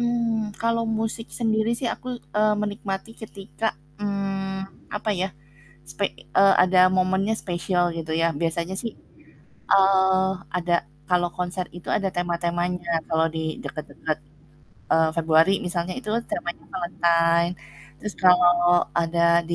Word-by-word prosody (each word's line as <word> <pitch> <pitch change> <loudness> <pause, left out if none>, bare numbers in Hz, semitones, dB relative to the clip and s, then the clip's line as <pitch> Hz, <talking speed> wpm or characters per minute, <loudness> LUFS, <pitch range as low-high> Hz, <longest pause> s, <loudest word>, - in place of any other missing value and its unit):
Mmm, 230 -3 0
kalau 230 0 +1 0.2
musik 225 +1 -3
sendiri 220 -1 +1
sih - - -4
aku, - - -17 0.3
eee, 215 0 +4
menikmati 205 0 -4
ketika, 220 0 -6 0.3
mmm, 195 -1 -4
apa 215 +1 -2
ya, 190 - 0 0.6
spe 150 +8 -1 0.3
eee, 195 0 +7
ada 185 0 +2 0.2
momennya 190 +3 +2
spesial 175 0 0
gitu 160 -1 -5
ya, 165 - +3
biasanya 170 +2 -1
sih, 230 - -4 0.8
eee, 190 -1 +5 0.3
ada 175 -1 0 0.4
kalau 175 0 +3
konser 180 0 -2
itu 175 - -11
ada 195 - +1
tema-temanya. 175 0 -1 0.2
Kalau 160 0 +2
di - - -1 0.2
deket-deket, 155 0 -4 0.8
eee, 160 0 +4
Februari 165 +3 +4
misalnya, 175 0 -2
itu 215 -5 -6 0.2
temanya 175 0 -4
Valentine, 170 -1 +2 0.5
terus 210 -2 -6
kalau 175 -1 +5
ada 170 0 +3
di - - +2
185 Hz, 125 wpm, -24 LUFS, 170-205 Hz, 0.8 s, eee